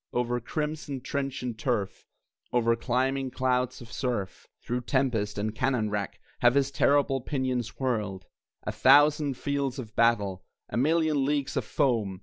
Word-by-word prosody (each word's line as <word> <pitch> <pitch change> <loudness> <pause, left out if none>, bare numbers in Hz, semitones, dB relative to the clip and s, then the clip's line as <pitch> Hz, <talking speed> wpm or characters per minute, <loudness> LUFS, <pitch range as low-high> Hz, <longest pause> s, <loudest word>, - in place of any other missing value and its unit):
Over 120 0 0
crimson 150 +1 -4
trench 135 0 -3
and 120 -2 -3
turf, 110 -4 -2 0.4
Over 115 -1 +3
climbing 130 +3 0
clouds 125 -1 0
of 115 -2 -11
surf, 120 -8 -3 0.2
Through 125 +1 -2
tempest 120 -6 0
and 105 +1 -2
cannon 115 -3 0
wrack, 100 -2 -3 0.2
Have 120 +1 +4
his 140 -1 +2
terrible 140 -1 +2
pinions 125 -4 -2
whirled 105 -8 -2 0.4
(A - - -2
thousand 145 0 +5
fields 140 -2 -2
of 110 -5 -8
battle! 105 -5 +2 0.3
A - - -5
million 155 +2 +2
leagues 140 0 0
of 130 -5 -1
foam!) 110 -11 0
125 Hz, 145 wpm, -28 LUFS, 115-140 Hz, 0.4 s, thousand